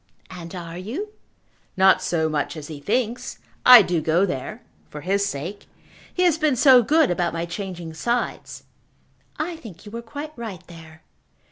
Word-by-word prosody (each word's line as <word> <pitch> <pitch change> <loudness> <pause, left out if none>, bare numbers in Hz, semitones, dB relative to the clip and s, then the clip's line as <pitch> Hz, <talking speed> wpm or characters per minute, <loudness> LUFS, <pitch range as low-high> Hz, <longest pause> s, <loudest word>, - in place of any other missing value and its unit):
"And 175 -1 -9
are 170 -1 -7
you?" 270 - -5 0.7
"Not 190 0 +5
so 160 -2 0
much 155 +1 -2
as 150 0 -8
he 150 -2 -7
thinks. 235 - -2 0.3
I 250 -4 +10
do 175 -3 -1
go 165 +5 +2
there, 195 - -5 0.3
for 150 - -8
his 195 +5 0
sake. 180 +5 -6 0.4
He 365 - 0
has 335 -3 +3
been 305 -4 +2
so 255 0 +7
good 295 - +3
about 175 -1 -1
my 165 0 -2
changing 175 -2 -6
sides." 235 +9 -3 0.7
"I 330 +2 -3
think 205 - -12
you 205 - -10
were 230 +1 -6
quite 285 +7 -8
right 220 -7 -8
there." 160 -2 -14
190 Hz, 165 wpm, -23 LUFS, 165-245 Hz, 0.7 s, I